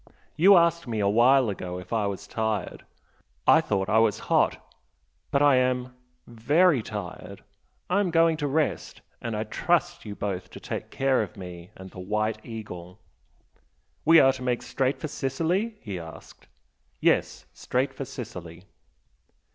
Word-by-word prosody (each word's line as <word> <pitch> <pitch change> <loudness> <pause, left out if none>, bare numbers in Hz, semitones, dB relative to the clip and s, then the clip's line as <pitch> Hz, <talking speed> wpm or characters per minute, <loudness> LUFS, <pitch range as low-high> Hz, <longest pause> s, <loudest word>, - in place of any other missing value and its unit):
You 190 +4 +7
asked 170 -2 +2
me 115 -2 -2
a 100 - +2
while 120 +5 +5
ago 90 -2 -6
if 90 +5 -8
I 110 -3 +1
was 100 0 -5
tired 110 0 -3 0.6
I - - +6
thought 95 -1 -1
I 110 - +3
was 110 -2 +3 0.2
Hot, - - +3 0.7
but 140 - +2
I 145 -3 +5
am 125 0 0 0.3
very 145 +6 +2
tired! 105 -4 -8 0.4
I 185 +3 +1
am 200 -3 +1
going 165 -1 +3
to 145 -2 -2
rest. 150 +2 -1 0.2
And 115 -2 -3
I 105 - -1
trust 175 +9 0
you 105 -2 -7
both 95 -3 -4
to - - -11
take - - -6
care 135 -1 +1
of - - -6
me 90 -2 -9
and 95 0 -11
the - - -11
'White 105 +3 -2
Eagle'!" 95 -5 -9 1.0
"We 165 +1 +7
are 135 -1 +5
to 130 - -9
make 125 -1 -1
straight 135 0 -1
for 155 - -4
Sicily?" 165 - -2
he 95 -4 -5
asked. 80 -3 -12 0.5
"Yes - - +1
straight 130 +2 -1
for 135 - -5
Sicily." 90 -9 -9
120 Hz, 160 wpm, -26 LUFS, 100-145 Hz, 1.0 s, You